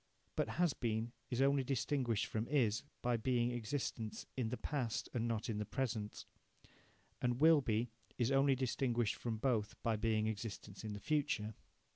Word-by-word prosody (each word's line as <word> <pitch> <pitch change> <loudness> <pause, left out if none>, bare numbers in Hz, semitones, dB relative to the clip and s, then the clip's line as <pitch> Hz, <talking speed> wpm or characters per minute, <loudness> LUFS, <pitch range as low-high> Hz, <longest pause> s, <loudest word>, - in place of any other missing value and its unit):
But - - +1
"has 175 -4 +4
been" 115 -1 -1 0.2
is 125 +2 +2
only 140 0 +4
distinguished 130 -3 +1
from 110 +1 -2
"is" 120 -7 +2 0.2
by 120 -1 +2
being 120 +1 +2
existence 120 -2 -3
in 125 -4 0
the 125 - -2
past 120 -2 -2
and 120 -2 0
not 115 -2 -1
in 110 -3 -1
the - - 0
present, 110 -2 -3 1.0
and 120 0 +1
"will 160 0 +7
be" 115 -1 +1 0.3
is 120 +1 +2
only 135 0 +5
distinguished 120 -3 +1
from 115 -2 -3
both 110 -4 +1
by 115 -2 +2
being 110 -1 +2
existence 105 -2 -4
in 110 -1 -3
the 105 - -5
future. 125 -7 0
120 Hz, 165 wpm, -37 LUFS, 110-135 Hz, 1.0 s, will